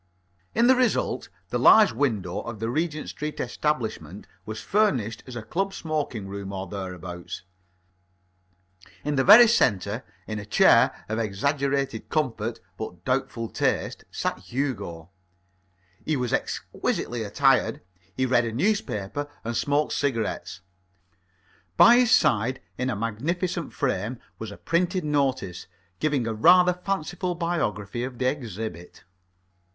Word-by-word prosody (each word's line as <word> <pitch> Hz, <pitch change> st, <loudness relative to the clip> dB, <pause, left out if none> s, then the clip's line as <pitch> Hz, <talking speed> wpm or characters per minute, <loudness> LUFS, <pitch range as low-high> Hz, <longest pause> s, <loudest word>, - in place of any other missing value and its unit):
In 235 Hz, -, +4 dB
the 260 Hz, -, +7 dB
result, 255 Hz, -2 st, 0 dB, 0.2 s
the -, -, -1 dB
large 215 Hz, -2 st, +7 dB
window 110 Hz, -8 st, -1 dB
of 115 Hz, -3 st, -7 dB
the 115 Hz, +1 st, -2 dB
Regent 155 Hz, +1 st, -2 dB
Street 150 Hz, 0 st, -5 dB
establishment 130 Hz, -1 st, -2 dB, 0.2 s
was 110 Hz, 0 st, -5 dB
furnished 125 Hz, -, 0 dB
as 130 Hz, -, -8 dB
a 120 Hz, -, -5 dB
club 195 Hz, -, -2 dB
smoking 150 Hz, -10 st, -3 dB
room 100 Hz, 0 st, -6 dB
or 95 Hz, -1 st, -4 dB
thereabouts. 90 Hz, -2 st, -7 dB, 1.6 s
In 150 Hz, -, 0 dB
the 135 Hz, -, +3 dB
very 225 Hz, -, +10 dB
centre, 110 Hz, -, +1 dB, 0.2 s
in 110 Hz, -1 st, -4 dB
a -, -, -6 dB
chair -, -, +4 dB
of 110 Hz, +1 st, -2 dB
exaggerated 135 Hz, +3 st, -1 dB
comfort 115 Hz, -7 st, -1 dB, 0.2 s
but 90 Hz, -5 st, -7 dB
doubtful 125 Hz, -3 st, -1 dB
taste, -, -, -1 dB
sat -, -, -2 dB
Hugo. 100 Hz, -, -4 dB, 0.9 s
He 155 Hz, -2 st, 0 dB
was 125 Hz, -2 st, -2 dB
exquisitely 120 Hz, 0 st, -2 dB
attired. 125 Hz, +1 st, +2 dB, 0.4 s
He 130 Hz, -, +2 dB
read 125 Hz, -2 st, +3 dB
a 115 Hz, -, -2 dB
newspaper 145 Hz, -, -1 dB
and 115 Hz, +1 st, -3 dB
smoked 145 Hz, +4 st, +1 dB
cigarettes. 115 Hz, -9 st, -2 dB, 1.2 s
By 240 Hz, +1 st, +8 dB
his 245 Hz, -2 st, +4 dB
side, 120 Hz, +4 st, +3 dB, 0.2 s
in 125 Hz, +1 st, -2 dB
a 125 Hz, -, -1 dB
magnificent 165 Hz, -, -2 dB
frame, 120 Hz, -2 st, -2 dB, 0.2 s
was 110 Hz, -, -5 dB
a 100 Hz, -, -10 dB
printed 180 Hz, +2 st, 0 dB
notice, 135 Hz, -11 st, -1 dB, 0.3 s
giving 145 Hz, -6 st, +1 dB
a 115 Hz, -, -1 dB
rather 180 Hz, +10 st, +6 dB
fanciful 180 Hz, -1 st, -3 dB
biography 120 Hz, -, -2 dB
of 125 Hz, -1 st, -5 dB
the 125 Hz, -, -1 dB
exhibit. 110 Hz, -, -4 dB
125 Hz, 130 wpm, -25 LUFS, 110-155 Hz, 1.6 s, very